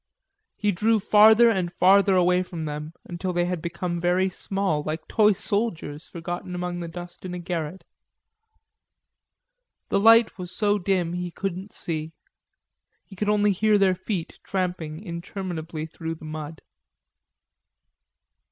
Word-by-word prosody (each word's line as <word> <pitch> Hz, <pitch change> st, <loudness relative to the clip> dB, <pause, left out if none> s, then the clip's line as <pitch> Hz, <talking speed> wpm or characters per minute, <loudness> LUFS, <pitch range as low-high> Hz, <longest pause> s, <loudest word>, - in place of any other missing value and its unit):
He 210 Hz, -1 st, +1 dB
drew 215 Hz, +4 st, +2 dB
farther 215 Hz, +3 st, +6 dB
and 185 Hz, -5 st, -1 dB
farther 195 Hz, +2 st, +5 dB
away 180 Hz, 0 st, +4 dB
from 170 Hz, -3 st, -5 dB
them 150 Hz, +1 st, -5 dB
until 180 Hz, +1 st, -4 dB
they 175 Hz, 0 st, +1 dB
had 180 Hz, -2 st, -2 dB
become 175 Hz, 0 st, -3 dB
very 180 Hz, +2 st, +2 dB
small, 195 Hz, -5 st, -1 dB
like 155 Hz, +2 st, -5 dB
toy 215 Hz, -1 st, +4 dB
soldiers 190 Hz, -7 st, -2 dB
forgotten 175 Hz, +1 st, -6 dB
among 180 Hz, 0 st, -3 dB
the 170 Hz, -, -5 dB
dust 175 Hz, +1 st, -9 dB
in 180 Hz, -1 st, -5 dB
a -, -, -4 dB
garret. 175 Hz, 0 st, -4 dB, 2.1 s
The 200 Hz, -, +2 dB
light 225 Hz, 0 st, +6 dB
was 180 Hz, -1 st, -6 dB
so 205 Hz, +2 st, +1 dB
dim 180 Hz, -2 st, 0 dB
he 180 Hz, 0 st, -3 dB
couldn't 190 Hz, +2 st, -5 dB
see, 160 Hz, -1 st, -5 dB, 0.9 s
he 195 Hz, -, -13 dB
could 205 Hz, +2 st, -1 dB
only 210 Hz, 0 st, +3 dB
hear 210 Hz, +2 st, +3 dB
their 195 Hz, -2 st, +4 dB
feet 185 Hz, -1 st, -5 dB
tramping 180 Hz, -3 st, -3 dB
interminably 170 Hz, -3 st, -5 dB
through 165 Hz, 0 st, -6 dB
the 160 Hz, -, -12 dB
mud. 155 Hz, 0 st, -7 dB
180 Hz, 140 wpm, -25 LUFS, 170-200 Hz, 2.1 s, farther